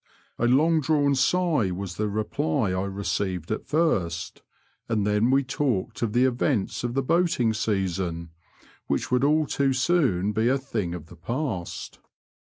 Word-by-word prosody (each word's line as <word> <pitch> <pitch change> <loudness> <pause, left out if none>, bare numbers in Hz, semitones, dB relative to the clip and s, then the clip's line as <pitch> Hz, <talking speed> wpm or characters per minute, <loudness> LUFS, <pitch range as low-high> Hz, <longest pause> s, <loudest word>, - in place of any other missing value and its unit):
A 120 - +2
long 155 +6 +4
drawn 145 0 +2
sigh 140 - +2
was 90 -1 -5
the 105 - 0
reply 100 -2 -1
I 95 +1 -1
received 95 -3 -3
at 110 - -3
first, 100 - 0 0.5
and 110 -3 +1
then 105 +3 +2
we 135 +1 +3
talked 125 -5 -2
of 115 -3 -1
the 125 +2 +4
events 125 -4 0
of 120 0 -2
the 135 - +1
boating 145 -7 +2
season, 95 -6 -2 0.6
which - - -1
would 125 +1 +2
all 155 +2 +3
too 140 -1 +1
soon 130 - +2
be 110 +2 +1
a 135 +2 +3
thing 110 -10 -3
of 85 -3 -8
the 90 +2 -14
past. 100 - -4
115 Hz, 155 wpm, -25 LUFS, 95-135 Hz, 0.6 s, long